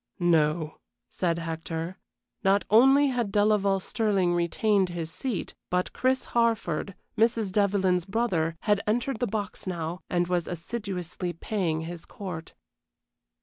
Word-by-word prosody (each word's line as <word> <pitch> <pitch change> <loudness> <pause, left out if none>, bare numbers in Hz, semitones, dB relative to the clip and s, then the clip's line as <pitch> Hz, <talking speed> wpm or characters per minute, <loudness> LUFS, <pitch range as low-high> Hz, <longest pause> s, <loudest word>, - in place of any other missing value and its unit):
"No," 160 -2 +2 0.3
said 170 -2 0
Hector. 165 +2 -4 0.4
Not 195 +1 +3
only 270 +6 +6
had 240 -5 -1
Delaval 205 -1 +3
Stirling 195 -3 +1
retained 185 +3 +2
his 165 -2 -4
seat, 230 +3 -4 0.2
but 180 0 0
Chris 260 0 +1
Harford, 220 -6 +1 0.2
Mrs. 225 -3 +2
Devlyn's 190 -3 +2
brother, 190 -7 0
had 205 -2 +2
entered 240 +3 0
the 245 - +1
box 205 -2 -4
now 170 -1 -3
and 175 -1 +2
was 175 -1 0
assiduously 180 -1 -4
paying 170 -3 -1
his 170 +1 -7
court. 180 -5 -7
190 Hz, 125 wpm, -27 LUFS, 170-215 Hz, 0.4 s, only